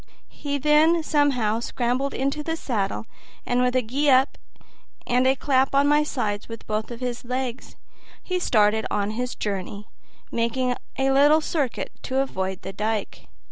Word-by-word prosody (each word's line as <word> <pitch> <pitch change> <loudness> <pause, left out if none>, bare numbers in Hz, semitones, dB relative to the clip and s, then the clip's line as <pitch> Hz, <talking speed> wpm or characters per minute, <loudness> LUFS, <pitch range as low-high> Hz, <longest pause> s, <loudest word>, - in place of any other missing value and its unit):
He 285 -1 -4
then 305 +4 +4
somehow 265 -8 +1
scrambled 250 +3 -1
into 275 +3 -1
the 325 +2 -2
saddle, 220 -9 -2 0.4
and 245 0 +1
with 250 0 +1
a 255 - +3
"Gee 275 +6 0
up" 265 +2 +4 0.7
and 250 +1 +2
a 265 - +4
clap 270 0 +1
on 280 +1 +4
my 295 +1 +4
sides 210 -8 -3
with 230 0 -8
both 215 0 -2
his 245 0 -4
legs, 250 0 -4 0.5
he 365 -1 -1
started 220 -7 +2
on 205 0 -1
his 250 +3 -3
journey, 200 0 -4 0.4
making 245 +2 0 0.2
a 270 0 +2
little 290 +3 +5
circuit 295 -5 -2
to 260 - -3
avoid 190 -8 -2
the 190 - -6
dike. 215 +1 -3
250 Hz, 155 wpm, -24 LUFS, 220-280 Hz, 0.7 s, little